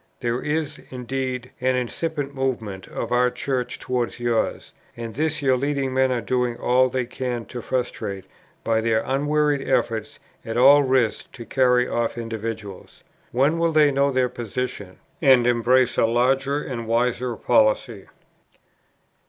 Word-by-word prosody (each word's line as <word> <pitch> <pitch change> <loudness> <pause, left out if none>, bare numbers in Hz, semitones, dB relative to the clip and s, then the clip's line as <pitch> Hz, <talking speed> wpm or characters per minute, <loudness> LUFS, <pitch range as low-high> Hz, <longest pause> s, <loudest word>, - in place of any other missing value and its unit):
There 120 0 -1
is, 150 0 -2
indeed, 125 0 -4
an 130 0 +2
incipient 140 +3 -3
movement 115 -8 -3
of 115 - -5
our 125 +1 +3
Church 125 0 -3
towards 125 -1 -3
yours, 120 -2 -1 0.2
and 115 -1 -6
this 155 +2 -1
your 130 -1 +4
leading 140 0 -1
men 130 0 +2
are 125 -2 0
doing 125 0 -1
all 130 +1 +3
they 130 -1 -1
can 120 -1 -4
to 120 - -6
frustrate 110 -6 -3 0.4
by 115 -1 +1
their 110 -1 +1
unwearied 145 +1 0
efforts 110 -2 0 0.3
at 115 - -4
all 140 +4 +7
risks 130 -5 +1
to 120 - -9
carry 125 -1 +3
off 120 0 -1
individuals. 110 -3 -6 0.3
When 140 +7 +2
will 165 -1 +1
they 150 -2 +5
know 140 +1 +2
their 130 -1 +2
position, 120 -4 -5 0.2
and 130 -5 +5
embrace 125 +1 +3
a - - +4
larger 135 +4 +1
and 120 -5 -5
wiser 120 +1 0
policy?" 110 -2 +1
125 Hz, 145 wpm, -23 LUFS, 115-135 Hz, 0.4 s, all